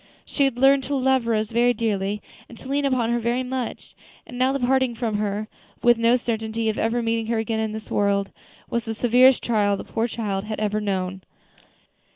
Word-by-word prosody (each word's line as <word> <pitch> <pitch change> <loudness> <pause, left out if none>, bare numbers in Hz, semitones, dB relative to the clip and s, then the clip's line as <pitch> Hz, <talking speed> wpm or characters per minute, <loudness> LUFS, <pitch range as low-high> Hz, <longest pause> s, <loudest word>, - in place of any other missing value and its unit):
She 280 - +1
had 265 -3 -1
learned 270 +1 +5
to 285 - -2
love 260 -2 +2
Rose 220 -1 0
very 240 +1 +3
dearly, 210 -2 -2 0.3
and 235 - -12
to 260 - -11
lean 280 +1 0
upon 250 -4 +1
her 240 - +1
very 240 +2 0
much; 255 -1 -5 0.3
and 245 - -11
now 255 +2 +2
the 275 - -1
parting 260 -1 +1
from 225 -2 -2
her, 210 +1 -2 0.4
with 240 -1 +5
no 230 +1 +4
certainty 225 -2 -2
of 215 - -2
ever 235 +2 0
meeting 225 -1 -1
her 230 0 0
again 220 0 -1
in 220 -1 -1
this 215 0 -8
world, 200 -1 +1 0.4
was 235 -1 -2
the 225 -1 -4
severest 250 +3 +4
trial 205 -3 +1
the - - -6
poor 225 +1 -2
child 210 -4 -3
had 215 0 -4
ever 215 0 -1
known. 190 -2 -2
230 Hz, 205 wpm, -23 LUFS, 215-245 Hz, 0.4 s, learned